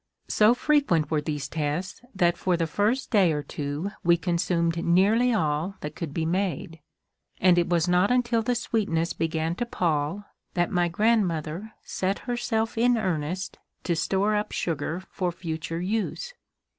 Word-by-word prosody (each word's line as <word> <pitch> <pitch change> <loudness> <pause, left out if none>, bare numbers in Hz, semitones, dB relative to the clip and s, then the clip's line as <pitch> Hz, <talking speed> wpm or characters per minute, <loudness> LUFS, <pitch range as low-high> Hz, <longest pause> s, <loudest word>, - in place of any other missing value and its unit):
So 215 +3 +5
frequent 245 - +2
were 155 -2 +2
these 150 -2 -3
tests 155 +4 -3
that 175 -2 +3
for 180 -2 0
the 165 - +1
first 210 - 0
day 195 -7 +5
or 150 -1 -2
two 145 +8 -4
we 170 -1 +5
consumed 170 -1 0
nearly 205 +8 +4
all 160 -2 0
that 150 0 -6
could 165 -5 -5
be 160 +2 -2
made; 170 -2 -2 0.6
and 185 -1 +5
it 175 0 +1
was 175 -1 +2
not 180 +3 +3
until 245 -2 +2
the 245 +2 0
sweetness 175 -8 0
began 160 0 -1
to 240 - -1
pall 165 0 -1 0.3
that 175 -1 +1
my 175 -1 +2
grandmother 185 -1 0
set 190 +1 -1
herself 225 -2 -1
in 245 0 +4
earnest 180 -2 -2 0.2
to 170 - 0
store 195 +5 +1
up 210 0 -1
sugar 165 +1 -2
for 180 -2 -1
future 165 -1 -4
use. 220 - -2
175 Hz, 155 wpm, -26 LUFS, 165-210 Hz, 0.6 s, So